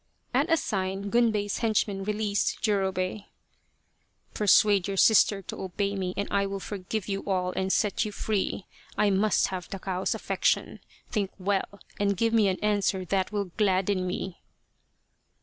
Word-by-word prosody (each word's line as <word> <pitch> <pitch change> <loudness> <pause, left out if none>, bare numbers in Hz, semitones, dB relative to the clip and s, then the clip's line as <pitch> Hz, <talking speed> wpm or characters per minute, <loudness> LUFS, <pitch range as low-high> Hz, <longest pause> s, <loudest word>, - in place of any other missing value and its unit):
At 285 +7 +2
a 330 - +5
sign 195 -5 -2
Gunbei's 220 -4 +1
henchmen 210 -3 0
released 210 0 -1
Jurobei. 195 -1 0 0.5
" - - -42
Persuade 205 -2 +4
your 195 -1 -3
sister 205 -1 +5
to - - -7
obey 200 +2 -2
me 185 -1 -3
and 200 - -1
I 200 0 +1
will 195 0 -4
forgive 200 +1 -4
you 195 -1 -3
all 185 -2 0
and 190 +1 -1
set 210 0 +1
you 210 - -4
free. 205 -2 -2 0.3
I 210 -1 +3
must 200 +2 +2
have 185 -2 -5
Takao's 190 -1 -2
affec - - -5
tion. - - +1 0.3
Think 205 -4 0
well, 200 +1 -2 0.2
and 200 -1 +1
give 230 +2 +1
me 220 -3 +4
an 190 -1 0
answer 200 -3 +1
that 190 +1 0
will 200 -3 -2
gladden 190 -2 +1
me." 180 0 -4
200 Hz, 160 wpm, -27 LUFS, 190-210 Hz, 0.5 s, a